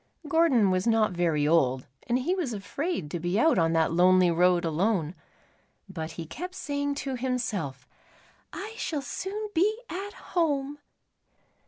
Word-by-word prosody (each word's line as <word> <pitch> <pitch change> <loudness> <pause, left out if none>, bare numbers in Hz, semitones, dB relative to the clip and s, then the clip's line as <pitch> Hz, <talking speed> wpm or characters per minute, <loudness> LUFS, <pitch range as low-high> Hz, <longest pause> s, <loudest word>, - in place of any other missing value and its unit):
Gordon 280 - +4
was 185 +3 0
not 225 -2 +3
very 165 -4 +1
old, 130 -5 +2 0.2
and 240 - +2
he 285 +8 0
was 340 -11 -2
afraid 215 - -3
to 175 - -3
be 175 +5 0
out 315 - +4
on 165 0 +2
that 160 -1 +2
lonely 180 0 +5
road 175 +1 +3
alone, 165 0 0 0.7
but 165 -4 -6
he 165 - -6
kept 360 - -7
saying 285 -2 -2
to 270 -1 -2
himself, 210 - -3 0.6
"I 430 +3 -7
shall 300 -9 -3
soon 415 +8 -4
be 405 +6 +2
at 395 +3 -5 0.2
home." 290 -4 0
220 Hz, 150 wpm, -27 LUFS, -, 0.7 s, lonely